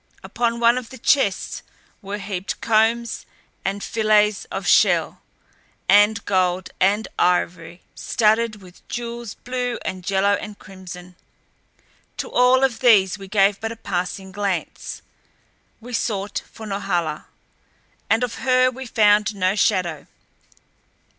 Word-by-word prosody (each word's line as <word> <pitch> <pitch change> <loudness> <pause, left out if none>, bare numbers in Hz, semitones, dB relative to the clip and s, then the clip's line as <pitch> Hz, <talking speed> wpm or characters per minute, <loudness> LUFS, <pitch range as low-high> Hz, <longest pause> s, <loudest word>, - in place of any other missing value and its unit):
Upon 235 -1 -1
one 235 +1 +4
of 245 - -11
the 260 - -10
chests 230 -11 +1 0.4
were 200 0 -5
heaped 195 -2 -5
combs 230 +1 +1 0.4
and 200 +1 -3
fillets 215 -2 +2
of - - -6
shell - - +3 0.7
and 205 +1 +4
gold 185 -1 0
and 205 +3 +2
ivory 175 -1 0
studded 220 -2 +1
with 180 -1 -17
jewels 235 -2 -5
blue 250 -1 -3
and 185 -1 -4
yellow 195 +1 +2
and 205 0 -4
crimson. 180 -2 -11 1.0
To - - -5
all 250 +1 +4
of 255 -4 +1
these 205 -6 +4
we 195 - -9
gave 200 0 +3
but 225 0 -3
a - - -6
passing 190 -2 -4
glance. 195 -3 -4 0.8
We 245 +2 -10
sought 205 -3 -2
for 220 - -10
Norhala. 175 -6 -2 0.8
And 225 +2 +3
of 245 - -3
her 255 -1 +3
we 260 +1 -8
found 210 -2 +3
no 185 0 +1
shadow. 180 -8 0
205 Hz, 125 wpm, -22 LUFS, 190-230 Hz, 1.0 s, one